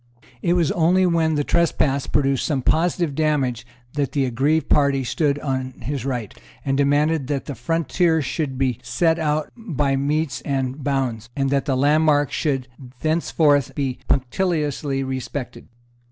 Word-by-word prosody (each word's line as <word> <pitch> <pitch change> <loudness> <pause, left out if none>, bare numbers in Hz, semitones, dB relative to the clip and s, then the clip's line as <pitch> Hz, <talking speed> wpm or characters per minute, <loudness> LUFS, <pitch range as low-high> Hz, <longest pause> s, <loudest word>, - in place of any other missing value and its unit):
It 170 - +2
was 170 -5 +2
only 180 +3 +3
when 165 -3 +2
the 145 - +1
trespass 145 -4 +1
produced 135 -3 +1
some 140 -5 -1
positive 170 0 +1
damage 135 -6 0 0.3
that 145 -2 -1
the 140 -2 +1
aggrieved 140 +6 +1
party 140 -2 +3
stood 140 +4 0
on 130 -3 -3
his 135 +2 -3
right, 120 -6 -3 0.3
and 135 - +1
demanded 145 +1 +2
that 140 -2 -2
the 145 - -5
frontier 165 - +1
should 135 -1 -3
be 130 -2 0
set 160 +8 +1
out 155 -1 -1
by 150 - -1
metes 145 +2 -1
and 135 0 -2
bounds, 130 -5 -1
and 135 -1 0
that 140 -1 +1
the 135 -2 0
landmarks 145 +1 +3
should 135 -5 -1 0.3
thenceforward 155 -3 +2
be 135 -3 -2
punctiliously 145 -1 0
respected. 130 -1 -5
145 Hz, 150 wpm, -22 LUFS, 135-155 Hz, 0.3 s, only